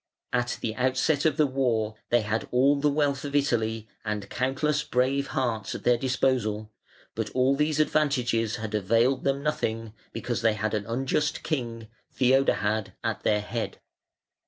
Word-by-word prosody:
At 120 Hz, 0 st, 0 dB
the 110 Hz, -, -2 dB
outset 130 Hz, +4 st, +1 dB
of 160 Hz, -, +2 dB
the 155 Hz, -, +5 dB
war 120 Hz, -6 st, 0 dB, 0.2 s
they 120 Hz, 0 st, +4 dB
had 110 Hz, +1 st, -2 dB
all 135 Hz, +3 st, +4 dB
the 150 Hz, +1 st, +3 dB
wealth 145 Hz, -1 st, 0 dB
of 145 Hz, -1 st, -4 dB
Italy 115 Hz, -6 st, +1 dB, 0.2 s
and 105 Hz, -2 st, -4 dB
countless 140 Hz, +4 st, 0 dB
brave 135 Hz, +3 st, +1 dB
hearts 115 Hz, -6 st, -2 dB
at -, -, -7 dB
their 120 Hz, -, +4 dB
disposal, 120 Hz, -5 st, 0 dB, 0.4 s
but -, -, -3 dB
all 130 Hz, +2 st, +3 dB
these 150 Hz, +1 st, +1 dB
advantages 125 Hz, -8 st, +1 dB
had 110 Hz, -2 st, -5 dB
availed 115 Hz, +6 st, +2 dB
them 140 Hz, 0 st, 0 dB
nothing 115 Hz, -7 st, -2 dB, 0.2 s
because 120 Hz, +1 st, -3 dB
they 115 Hz, -1 st, +3 dB
had 110 Hz, +1 st, -2 dB
an 105 Hz, -1 st, -2 dB
unjust 135 Hz, +5 st, -1 dB
king, 115 Hz, -7 st, -3 dB, 0.2 s
Theodahad, 125 Hz, -5 st, +2 dB
at -, -, -2 dB
their 105 Hz, -1 st, +2 dB
head. 115 Hz, +2 st, -4 dB
125 Hz, 155 wpm, -27 LUFS, 110-140 Hz, 0.4 s, the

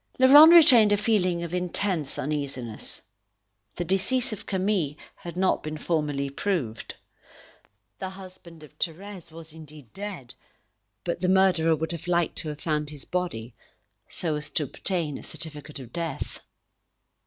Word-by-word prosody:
Laurent 290 Hz, +5 st, +9 dB
retained 260 Hz, -11 st, +8 dB
a 205 Hz, -, +4 dB
feeling 185 Hz, -5 st, +1 dB
of 170 Hz, 0 st, -6 dB
intense 180 Hz, -4 st, -2 dB
uneasiness. 135 Hz, -6 st, -4 dB, 0.7 s
The 175 Hz, -, -3 dB
decease 220 Hz, +7 st, +1 dB
of 210 Hz, -, -9 dB
Camille 190 Hz, -6 st, 0 dB, 0.2 s
had 170 Hz, 0 st, -9 dB
not 190 Hz, 0 st, +2 dB
been 155 Hz, 0 st, -5 dB
formally 150 Hz, -4 st, -1 dB
proved. 140 Hz, -, -3 dB, 1.0 s
The 190 Hz, -, -4 dB
husband 185 Hz, -4 st, -11 dB
of 150 Hz, -, -15 dB
Thérèse 180 Hz, +1 st, -4 dB
was 160 Hz, -1 st, -3 dB
indeed 150 Hz, -6 st, -12 dB
dead, 195 Hz, -11 st, -7 dB, 0.7 s
but 170 Hz, -, -3 dB
the 180 Hz, -, +1 dB
murderer 180 Hz, -4 st, +4 dB
would 160 Hz, +2 st, -3 dB
have 170 Hz, 0 st, -7 dB
liked 175 Hz, -2 st, +1 dB
to 155 Hz, -, -5 dB
have 150 Hz, -1 st, -7 dB
found 150 Hz, -2 st, -1 dB
his 150 Hz, -2 st, -7 dB
body, 130 Hz, -11 st, -3 dB, 0.6 s
so 165 Hz, -3 st, -1 dB
as 150 Hz, 0 st, -5 dB
to 155 Hz, -, 0 dB
obtain 155 Hz, +1 st, -3 dB
a -, -, -12 dB
certificate 150 Hz, -2 st, -8 dB
of 125 Hz, -3 st, -11 dB
death. 165 Hz, -4 st, -4 dB
170 Hz, 145 wpm, -26 LUFS, 150-190 Hz, 1.0 s, Laurent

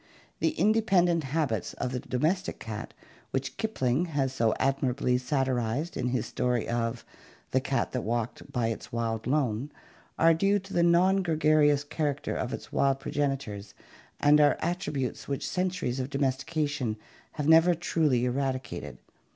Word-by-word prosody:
The 320 Hz, -, 0 dB
independent 185 Hz, -7 st, +3 dB
habits 135 Hz, -, -1 dB
of 125 Hz, -, -3 dB
the 125 Hz, -, -2 dB
domestic 155 Hz, +8 st, -1 dB
cat 110 Hz, -1 st, -7 dB, 0.3 s
which 135 Hz, 0 st, -3 dB
Kipling 160 Hz, -, 0 dB
has 140 Hz, -5 st, -1 dB
so 115 Hz, -4 st, +2 dB
admirably 130 Hz, -2 st, +1 dB
satirized 130 Hz, +2 st, -1 dB
in 125 Hz, -, -1 dB
his 125 Hz, +1 st, -1 dB
story 125 Hz, -2 st, -1 dB
of 120 Hz, 0 st, -2 dB, 0.5 s
"the 130 Hz, -, +2 dB
cat 135 Hz, 0 st, -1 dB
that 125 Hz, -, -2 dB
walked 115 Hz, +1 st, -3 dB
by 120 Hz, -2 st, 0 dB
its 115 Hz, -, -6 dB
wild 115 Hz, -1 st, -2 dB
lone," 135 Hz, -1 st, 0 dB, 0.5 s
are 165 Hz, 0 st, +5 dB
due 195 Hz, +5 st, +2 dB
to 195 Hz, 0 st, -8 dB
the 175 Hz, -, +3 dB
non 180 Hz, +3 st, +4 dB
gregarious 155 Hz, -4 st, +3 dB
character 145 Hz, -2 st, -2 dB
of -, -, -2 dB
its -, -, -7 dB
wild 135 Hz, -1 st, +2 dB
progenitors, 135 Hz, -10 st, -3 dB, 0.4 s
and 150 Hz, +1 st, +5 dB
are 145 Hz, -1 st, +4 dB
attributes 155 Hz, -, -3 dB
which 140 Hz, -1 st, -2 dB
centuries 180 Hz, -9 st, -1 dB
of 130 Hz, +1 st, -3 dB
domestication 140 Hz, -3 st, -1 dB, 0.4 s
have 150 Hz, -2 st, -3 dB
never 165 Hz, +2 st, +6 dB, 0.2 s
wholly 140 Hz, -7 st, +3 dB
eradicated. 130 Hz, 0 st, -3 dB
140 Hz, 145 wpm, -28 LUFS, 125-160 Hz, 0.5 s, never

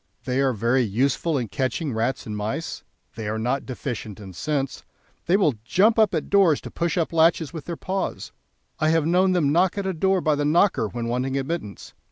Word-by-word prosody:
They 130 Hz, +1 st, 0 dB
are 135 Hz, -1 st, +3 dB
very 120 Hz, +3 st, +1 dB
useful 130 Hz, -, 0 dB
in 120 Hz, -5 st, -3 dB
catching 135 Hz, -, -2 dB
rats 115 Hz, +4 st, -1 dB
and 105 Hz, -, -5 dB
mice; 110 Hz, +10 st, -4 dB, 0.3 s
they 110 Hz, -2 st, -6 dB
are 110 Hz, -, -2 dB
not 125 Hz, +5 st, -1 dB
deficient 120 Hz, -5 st, -5 dB
in 95 Hz, -3 st, -10 dB
sense; 140 Hz, -, -3 dB, 0.4 s
they 180 Hz, +3 st, +4 dB
will 170 Hz, -9 st, +3 dB
jump 215 Hz, -, +3 dB
up 210 Hz, -5 st, +4 dB
at 155 Hz, -, -2 dB
doors 190 Hz, -7 st, +4 dB
to -, -, -9 dB
push 170 Hz, +1 st, -1 dB
up 165 Hz, -1 st, 0 dB
latches 165 Hz, -1 st, +3 dB
with 160 Hz, -3 st, -7 dB
their 170 Hz, -2 st, -5 dB
paws. 190 Hz, +1 st, -3 dB, 0.5 s
I 155 Hz, -1 st, +2 dB
have 165 Hz, -1 st, +2 dB
known 185 Hz, +3 st, +3 dB
them 155 Hz, -6 st, +2 dB
knock 180 Hz, +5 st, +2 dB
at 200 Hz, -, -2 dB
a 190 Hz, -, -1 dB
door 190 Hz, +3 st, +2 dB
by 155 Hz, -3 st, +1 dB
the 145 Hz, 0 st, 0 dB
knocker 150 Hz, -, +3 dB
when 120 Hz, +2 st, -5 dB
wanting 130 Hz, +3 st, -1 dB
admittance. 135 Hz, -, -5 dB
145 Hz, 210 wpm, -24 LUFS, 125-170 Hz, 0.5 s, they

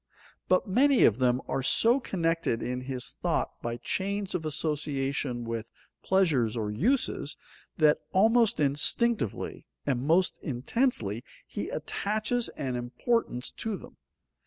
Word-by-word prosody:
But 185 Hz, -, +2 dB
many 260 Hz, +7 st, +4 dB
of 110 Hz, +3 st, +4 dB
them 125 Hz, 0 st, +2 dB
are 135 Hz, -, -1 dB
so 230 Hz, -, +4 dB
connected 165 Hz, -, -1 dB
in 125 Hz, 0 st, -3 dB
his 130 Hz, -1 st, -4 dB
thought -, -, -1 dB
by 120 Hz, 0 st, -3 dB
chains 200 Hz, +6 st, -2 dB
of 165 Hz, -4 st, -2 dB
association 140 Hz, -4 st, -1 dB
with 115 Hz, -1 st, -4 dB, 0.3 s
pleasures 145 Hz, -, +2 dB
or 105 Hz, -2 st, -2 dB
uses, 240 Hz, -, 0 dB, 0.4 s
that 155 Hz, -2 st, +4 dB
almost 225 Hz, +3 st, +4 dB
instinctively 150 Hz, -, +1 dB, 0.2 s
and 130 Hz, -4 st, 0 dB
most 165 Hz, +7 st, +2 dB
intensely 125 Hz, -, -1 dB, 0.2 s
he -, -, -5 dB
attaches 215 Hz, +3 st, -1 dB
an 130 Hz, -3 st, -2 dB
importance 125 Hz, -, -1 dB
to 220 Hz, -3 st, -2 dB
them. -, -, -14 dB
150 Hz, 125 wpm, -28 LUFS, 125-205 Hz, 0.4 s, many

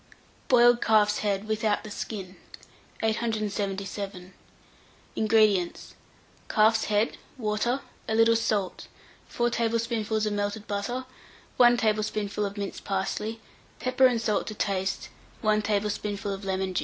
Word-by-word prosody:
BOILED 240 Hz, -1 st, +6 dB
CALF'S 210 Hz, -1 st, +3 dB
HEAD 205 Hz, 0 st, -1 dB
(without 215 Hz, -1 st, 0 dB
the 215 Hz, -, -8 dB
Skin). 195 Hz, -3 st, -6 dB, 0.7 s
877. 200 Hz, -4 st, -2 dB, 0.8 s
INGREDIENTS. 215 Hz, -5 st, +2 dB, 0.6 s
Calf's 220 Hz, 0 st, +4 dB
head, 210 Hz, +2 st, 0 dB, 0.2 s
water, 235 Hz, +3 st, 0 dB, 0.3 s
a 220 Hz, -, 0 dB
little 225 Hz, 0 st, +5 dB
salt, 215 Hz, -4 st, -1 dB, 0.4 s
4 240 Hz, 0 st, 0 dB
tablespoonfuls 230 Hz, -2 st, 0 dB
of 210 Hz, -, -1 dB
melted 205 Hz, +1 st, -2 dB
butter, 210 Hz, +6 st, -3 dB, 0.5 s
1 240 Hz, -1 st, +6 dB
tablespoonful 215 Hz, -2 st, 0 dB
of 200 Hz, 0 st, -4 dB
minced 200 Hz, -1 st, -5 dB
parsley, 210 Hz, +3 st, -2 dB, 0.4 s
pepper 255 Hz, +1 st, +4 dB
and 245 Hz, -2 st, 0 dB
salt 220 Hz, -2 st, 0 dB
to 215 Hz, -, -5 dB
taste, 195 Hz, -2 st, -1 dB, 0.3 s
1 215 Hz, -1 st, +3 dB
tablespoonful 205 Hz, -1 st, -1 dB
of 195 Hz, +1 st, -7 dB
lemon 190 Hz, -1 st, -1 dB
juice. -, -, +1 dB
215 Hz, 120 wpm, -27 LUFS, 200-225 Hz, 0.8 s, BOILED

